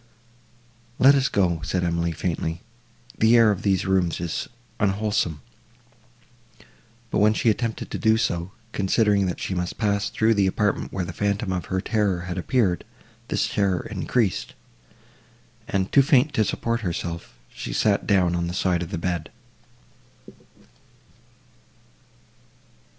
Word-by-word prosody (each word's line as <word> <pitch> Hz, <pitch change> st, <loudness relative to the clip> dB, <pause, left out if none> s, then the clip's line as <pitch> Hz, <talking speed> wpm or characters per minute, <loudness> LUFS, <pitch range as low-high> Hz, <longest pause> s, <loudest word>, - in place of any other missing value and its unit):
"Let 135 Hz, +2 st, +7 dB
us 135 Hz, -1 st, +2 dB
go," 85 Hz, -5 st, +1 dB
said 90 Hz, 0 st, -1 dB
Emily, 85 Hz, 0 st, 0 dB
faintly, 80 Hz, 0 st, -3 dB, 0.6 s
"the 115 Hz, +2 st, +5 dB
air 115 Hz, -2 st, +6 dB
of 100 Hz, -1 st, -2 dB
these 95 Hz, -3 st, +1 dB
rooms 95 Hz, -3 st, +1 dB
is 85 Hz, -2 st, -3 dB, 0.3 s
unwholesome;" 100 Hz, -6 st, 0 dB, 1.7 s
but, -, -, +1 dB
when 105 Hz, +1 st, +4 dB
she 115 Hz, -, +3 dB
attempted 115 Hz, +1 st, -3 dB
to -, -, -3 dB
do 110 Hz, 0 st, +3 dB
so, 85 Hz, -5 st, -1 dB, 0.2 s
considering 100 Hz, 0 st, +2 dB
that 90 Hz, -, -3 dB
she -, -, -3 dB
must 90 Hz, -1 st, -3 dB
pass 100 Hz, -2 st, 0 dB
through 115 Hz, 0 st, +2 dB
the 100 Hz, -3 st, +2 dB
apartment 105 Hz, +2 st, 0 dB
where 90 Hz, -2 st, -2 dB
the -, -, -6 dB
phantom 100 Hz, -1 st, -1 dB
of 90 Hz, -, -3 dB
her 95 Hz, 0 st, -2 dB
terror 100 Hz, -5 st, 0 dB
had 90 Hz, 0 st, -4 dB
appeared, 95 Hz, -4 st, +1 dB, 0.4 s
this -, -, 0 dB
terror 95 Hz, -3 st, 0 dB
increased, 110 Hz, -8 st, -1 dB, 1.1 s
and, 95 Hz, -1 st, -1 dB
too 140 Hz, -, +6 dB
faint 135 Hz, +1 st, +3 dB
to 110 Hz, -, +3 dB
support 115 Hz, +3 st, -1 dB
herself, 85 Hz, -, -5 dB, 0.2 s
she -, -, -6 dB
sat 105 Hz, -2 st, +1 dB
down 90 Hz, -4 st, +3 dB
on 85 Hz, 0 st, -1 dB
the 90 Hz, -, -4 dB
side 90 Hz, -2 st, +1 dB
of 85 Hz, -, -4 dB
the 95 Hz, -, -3 dB
bed. 85 Hz, -2 st, -3 dB
95 Hz, 140 wpm, -24 LUFS, 90-110 Hz, 1.7 s, Let